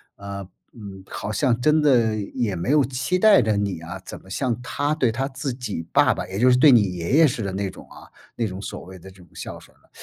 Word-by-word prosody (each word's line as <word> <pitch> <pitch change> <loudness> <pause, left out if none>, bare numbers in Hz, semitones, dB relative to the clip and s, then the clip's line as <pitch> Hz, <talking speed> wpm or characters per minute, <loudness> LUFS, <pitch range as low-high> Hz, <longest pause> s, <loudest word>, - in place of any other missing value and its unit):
啊， 100 -1 -7 0.3
嗯， 100 -5 -10
好 105 - -5
像 125 0 +1
真 155 +4 +3
的 120 -7 +3
也 105 0 -3
没 85 +10 -2
有 150 -1 +5
期 130 +8 -1
待 215 -8 +6
着 110 -2 +1
你 100 -5 -2
啊， 80 - -7
怎 - - -8
么 95 - -18
像 125 +3 -2
他 145 +4 -1
对 130 -7 +1
他 130 +4 -2
自 135 -1 -4
己 105 -10 -5
爸 - - +4
爸， - - -5
也 95 +2 -5
就 125 +2 +5
是 125 - +5
对 140 +1 +7
你 120 -3 +6
爷 85 +8 -3
爷 160 -2 +7
似 120 -3 -3
的 100 - -3
那 100 0 -2
种 - - -13
啊 - - -13 0.3
那 115 - -1
种 95 -1 -7
所 - - -7
谓 95 0 -11
的 95 +2 -13
这 95 - -20
种 90 -2 -17
孝 - - -7
顺 - - -20
了， - - -31
115 Hz, 275 characters per minute, -23 LUFS, 100-130 Hz, 0.3 s, 对